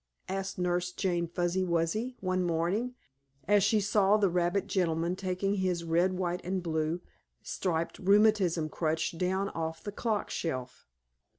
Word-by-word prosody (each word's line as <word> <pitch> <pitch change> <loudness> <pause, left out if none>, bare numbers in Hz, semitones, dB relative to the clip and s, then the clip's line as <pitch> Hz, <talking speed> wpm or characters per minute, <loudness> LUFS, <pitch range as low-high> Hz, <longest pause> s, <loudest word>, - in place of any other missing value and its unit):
asked 195 +1 -3
Nurse 180 0 0
Jane 175 -2 -1
Fuzzy 175 +2 0
Wuzzy, 180 +8 0
one 185 -1 0
morning, 180 +9 0 0.5
as 205 0 +5
she 215 +2 +3
saw 205 0 +3
the 200 -4 +2
rabbit 175 +2 +1
gentleman 170 -1 0
taking 185 +1 -1
his 185 -3 0
red, 170 +3 +2
white 180 -1 -2
and 185 0 -2
blue 160 +1 -1 0.4
striped 170 -3 -2
rheumatism 195 -5 +4
crutch 160 +1 -1
down 190 +3 0
off 160 0 -4
the 205 - -4
clock 215 0 -2
shelf. 130 -6 -4
180 Hz, 140 wpm, -30 LUFS, 170-195 Hz, 0.5 s, as